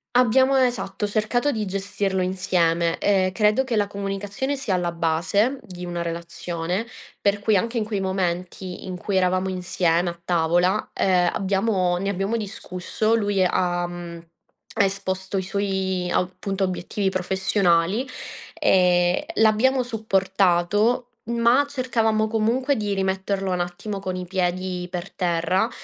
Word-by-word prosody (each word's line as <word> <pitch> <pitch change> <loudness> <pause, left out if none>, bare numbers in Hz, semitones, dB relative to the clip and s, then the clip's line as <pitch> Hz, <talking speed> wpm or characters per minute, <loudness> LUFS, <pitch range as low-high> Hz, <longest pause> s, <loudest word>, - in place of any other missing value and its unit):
Abbiamo, 260 +2 +4
esatto, 245 -6 0
cercato 220 +7 0
di 220 -5 -2
gestirlo 195 -1 -1
insieme. 170 -2 +1
Ehm, 190 -2 +2
credo 210 +5 +3
che 255 -3 -2
la 205 -1 +3
comunicazione 200 +7 -3
sia 250 -8 -2
alla 175 -1 0
base 175 +10 +1
di 180 -4 -9
una 175 -1 -3
relazione, 170 +4 -3 0.3
per 200 0 +2
cui 210 +1 +2
anche 230 +5 0
in 225 - +1
quei 210 -2 -2
momenti 185 -1 -3
in 185 -1 -5
cui 195 +2 -1
eravamo 185 +1 +1
insieme 180 -1 0
a 170 0 -8
tavola, 175 +2 +2
ehm, 180 -2 +3
abbiamo 190 -2 +1
ne 195 +2 -2
abbiamo 200 +4 -1
discusso. 210 +1 -2
Lui 205 -4 +2
ha, 175 -1 0
mhmm, 170 -1 -8 0.6
esposto 190 -1 -1
i 190 - -1
suoi 190 -2 -1
appunto 195 +2 -1
obiettivi 190 +2 -1
professionali, 190 +3 +1 0.5
ehm, 180 -1 +3
l'abbiamo 230 +4 +3
supportato, 200 0 +1 0.3
ma 235 +3 +4
cercavamo 225 -5 +1
comunque 230 +6 +1
di 205 -3 -1
rimetterlo 190 0 -1
un 180 - 0
attimo 175 +4 -4
con 185 -1 -4
i 180 0 -4
piedi 180 0 -2
per 180 +1 -5
terra 180 +4 +1
190 Hz, 135 wpm, -23 LUFS, 180-215 Hz, 0.6 s, Abbiamo